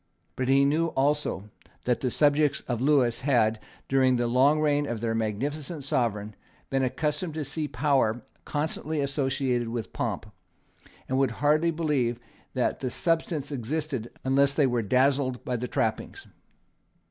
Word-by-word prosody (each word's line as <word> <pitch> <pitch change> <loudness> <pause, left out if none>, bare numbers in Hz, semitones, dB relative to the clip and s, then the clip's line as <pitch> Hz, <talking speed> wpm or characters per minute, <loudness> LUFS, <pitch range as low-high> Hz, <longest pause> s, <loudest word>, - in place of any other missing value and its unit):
But 130 - -2
he 135 +1 +5
knew 155 +4 +2
also 140 - -1 0.3
that 125 -2 +1
the 130 - +1
subjects 145 +1 +2
of 120 -2 -3
Lewis 130 -4 +3
had, 115 -5 +2 0.3
during 130 -1 +3
the 120 0 0
long 130 +6 +4
reign 145 -1 +2
of 120 -3 -3
their 115 0 -1
magnificent 140 - -3
sovereign, 115 -7 -1 0.4
been 135 0 +1
accustomed 150 +5 -1
to 155 -2 -3
see 150 +2 -3
power 135 -7 +1 0.2
constantly 155 +1 -2
associated 135 -3 0
with 115 -1 -5
pomp, - - -2 0.8
and 130 +1 0
would 135 -2 +3
hardly 155 +3 +3
believe 145 -8 0 0.4
that 125 - 0
the 130 - -2
substance 160 0 -1
existed 135 -1 -3
unless 140 +1 +3
they 150 - +4
were 120 -2 +1
dazzled 130 +3 +1
by 125 - -1
the 125 +1 -3
trappings. 110 -2 -2
135 Hz, 145 wpm, -27 LUFS, 120-150 Hz, 0.8 s, he